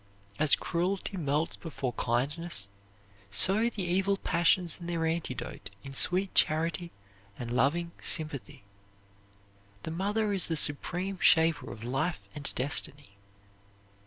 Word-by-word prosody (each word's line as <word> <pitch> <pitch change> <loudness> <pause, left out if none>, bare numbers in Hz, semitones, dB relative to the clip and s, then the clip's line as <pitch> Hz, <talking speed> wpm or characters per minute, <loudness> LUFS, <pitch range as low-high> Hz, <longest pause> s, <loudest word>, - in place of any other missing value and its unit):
As 155 -2 +6
cruelty 185 +3 -2
melts 155 -1 0
before 135 -6 -4
kindness, 125 0 -1 0.6
so 195 - +3
the 210 -5 -3
evil 190 +3 +2
passions 175 -1 +2
and 175 0 -6
their 165 -1 0
antidote 165 0 -3
in 135 - -8
sweet 185 +7 +2
charity 165 +2 +2 0.5
and 120 -1 -5
loving 155 +7 +2
sympathy. 150 -9 -2 1.2
The - - -4
mother 205 +5 0
is 190 -3 +1
the 165 - 0
supreme 180 +6 0
shaper 160 0 +4
of 110 - -9
life 135 +8 -2
and 145 -1 -3
destiny. 140 +1 -2
165 Hz, 120 wpm, -30 LUFS, 140-180 Hz, 1.2 s, As